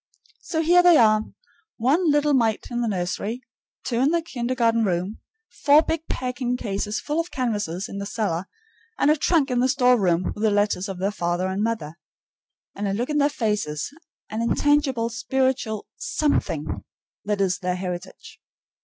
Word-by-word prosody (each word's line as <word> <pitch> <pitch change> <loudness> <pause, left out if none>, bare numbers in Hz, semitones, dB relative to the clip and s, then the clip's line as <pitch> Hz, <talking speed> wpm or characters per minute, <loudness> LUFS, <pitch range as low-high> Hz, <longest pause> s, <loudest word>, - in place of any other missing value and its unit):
So 320 -2 -2
here 350 +2 +6
they 350 -2 +7
are, 215 -1 +4 0.5
one 300 +9 +2
little 295 0 +3
mite 225 -5 +1
in 240 0 -1
the 235 - 0
nursery, 200 +5 -3 0.4
two 235 - -2
in 265 +4 +3
the 335 0 +1
kindergarten 235 -5 0
room, 185 +1 -1 0.4
four 295 +2 +7
big 325 0 -3
packing 250 -1 -2
cases 210 -1 -2
full 300 +8 -2
of 335 +1 -2
canvases 210 - -2
in 200 - -6
the 200 - -4
cellar, 195 -5 -2 0.5
and 290 - +4
a - - +4
trunk 300 -2 +2
in 245 - +1
the 255 +1 +3
store 250 -2 +4
room 175 -1 +2
with 210 - -9
the 220 - +3
letters 205 -1 +1
of 190 - -5
their 195 +3 -1
father 175 -1 -1
and 190 +2 -2
mother. 210 -8 -3 0.7
And 205 0 -3
a 195 - -1
look 240 +8 -2
in 295 - +1
their 285 0 +4
faces, 210 - -2 0.4
an 220 +1 -2
intangible 265 -1 +2
spiritual 235 -1 -1
SOMETHING, 290 - -1 0.4
that 205 -1 -1
is 185 -3 +1
their 180 -1 -1
heritage. 180 0 -7
230 Hz, 170 wpm, -24 LUFS, 200-275 Hz, 0.7 s, they